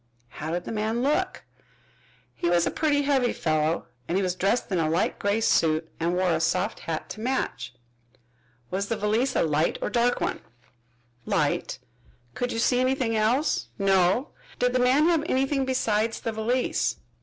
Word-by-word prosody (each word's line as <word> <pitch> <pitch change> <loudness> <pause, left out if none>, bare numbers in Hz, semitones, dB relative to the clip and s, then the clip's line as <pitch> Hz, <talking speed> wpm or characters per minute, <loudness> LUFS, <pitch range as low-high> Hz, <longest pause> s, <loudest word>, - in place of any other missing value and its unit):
"How 155 +5 -6
did 175 +2 -2
the - - -6
man 220 +2 -1
look?" 290 +3 0 0.9
"He 170 - -1
was 175 -1 +3
a - - 0
putty 290 -2 +1
heavy 270 -4 +2
fellow 155 0 0 0.2
and 180 - 0
he 195 - +1
was 180 -1 0
dressed 195 +5 0
in 185 - +1
a 155 -1 +1
light 165 +4 0
gray 205 +2 +1
suit 160 -5 +2
and 170 +2 0
wore 180 -1 +2
a 160 - +1
soft 185 +5 0
hat 160 -1 -4
to - - -7
match." 245 - -2 1.0
"Was 195 +2 -1
the 230 - -2
valise 225 +6 0
a - - +3
light 155 0 +1
or - - -2
a - - -14
dark 240 +1 +2
one?" - - -2 0.9
"Light." - - 0 0.6
"Could 245 0 -2
you - - -3
see 245 +2 +2
anything 255 -3 +1
else?" 220 - +1
"No." 195 +6 +2 0.3
"Did 250 0 +1
the 255 - +2
man 260 +5 +4
have 335 -2 +3
anything 270 +1 +1
besides 225 -4 0
the 225 - -3
valise?" 230 +4 0
220 Hz, 180 wpm, -26 LUFS, 175-255 Hz, 1.0 s, man